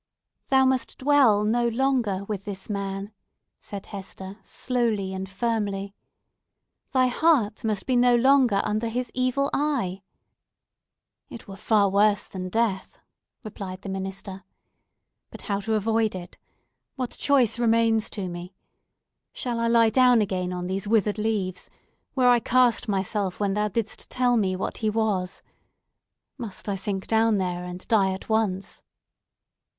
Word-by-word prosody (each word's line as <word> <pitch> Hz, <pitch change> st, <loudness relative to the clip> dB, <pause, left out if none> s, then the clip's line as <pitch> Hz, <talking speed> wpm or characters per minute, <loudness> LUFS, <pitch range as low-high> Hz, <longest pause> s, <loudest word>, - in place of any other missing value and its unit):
"Thou 265 Hz, -1 st, +4 dB
must 260 Hz, -2 st, 0 dB
dwell 260 Hz, -7 st, +4 dB
no 235 Hz, +3 st, +2 dB
longer 235 Hz, -5 st, 0 dB
with 200 Hz, -1 st, -5 dB
this 200 Hz, 0 st, -6 dB
man," 200 Hz, 0 st, -4 dB, 0.5 s
said 200 Hz, -1 st, -8 dB
Hester, 195 Hz, 0 st, -8 dB
slowly 225 Hz, -6 st, -1 dB
and 190 Hz, 0 st, -5 dB
firmly. 200 Hz, -2 st, -2 dB, 1.0 s
"Thy 260 Hz, -1 st, +3 dB
heart 250 Hz, -4 st, +2 dB
must 215 Hz, -3 st, -1 dB
be 255 Hz, -, +1 dB
no 245 Hz, 0 st, +5 dB
longer 250 Hz, -4 st, +4 dB
under 215 Hz, +2 st, -1 dB
his 245 Hz, +1 st, -3 dB
evil 255 Hz, +2 st, 0 dB
eye!" 250 Hz, -11 st, -1 dB, 1.3 s
"It 230 Hz, -, -10 dB
were 195 Hz, -, -8 dB
far 205 Hz, 0 st, +2 dB
worse 205 Hz, 0 st, +3 dB
than 185 Hz, -1 st, -6 dB
death!" 220 Hz, -2 st, -1 dB, 0.5 s
replied 195 Hz, -3 st, -7 dB
the 195 Hz, -, -6 dB
minister. 195 Hz, 0 st, -5 dB, 0.9 s
"But -, -, -11 dB
how 200 Hz, -1 st, -1 dB
to 220 Hz, +2 st, -1 dB
avoid 220 Hz, 0 st, +1 dB
it? 175 Hz, -1 st, -9 dB, 0.6 s
What 255 Hz, -3 st, -3 dB
choice 260 Hz, -5 st, +2 dB
remains 230 Hz, -1 st, +2 dB
to 200 Hz, -3 st, -5 dB
me? 175 Hz, +1 st, -8 dB, 0.8 s
Shall 240 Hz, -2 st, -3 dB
I 230 Hz, -, +1 dB
lie 230 Hz, -1 st, +4 dB
down 250 Hz, 0 st, +5 dB
again 185 Hz, -3 st, -1 dB
on 180 Hz, 0 st, -4 dB
these 190 Hz, +2 st, -3 dB
withered 210 Hz, -1 st, +2 dB
leaves, 205 Hz, -4 st, -2 dB, 0.5 s
where 255 Hz, -2 st, +3 dB
I 245 Hz, -1 st, +6 dB
cast 245 Hz, 0 st, +2 dB
myself 195 Hz, -1 st, -1 dB
when 200 Hz, -2 st, 0 dB
thou 210 Hz, +1 st, +1 dB
didst 220 Hz, +1 st, -4 dB
tell 250 Hz, -1 st, +2 dB
me 190 Hz, -5 st, +1 dB
what 185 Hz, -, -4 dB
he 220 Hz, -, +1 dB
was? 210 Hz, -4 st, -1 dB, 1.0 s
Must 215 Hz, -5 st, -7 dB
I 200 Hz, -, 0 dB
sink 195 Hz, 0 st, -3 dB
down 225 Hz, -1 st, +2 dB
there, 180 Hz, -2 st, -2 dB
and 180 Hz, +1 st, -8 dB
die 200 Hz, -4 st, +3 dB
at 190 Hz, -, -9 dB
once?" 210 Hz, -4 st, -1 dB
210 Hz, 145 wpm, -25 LUFS, 195-235 Hz, 1.3 s, I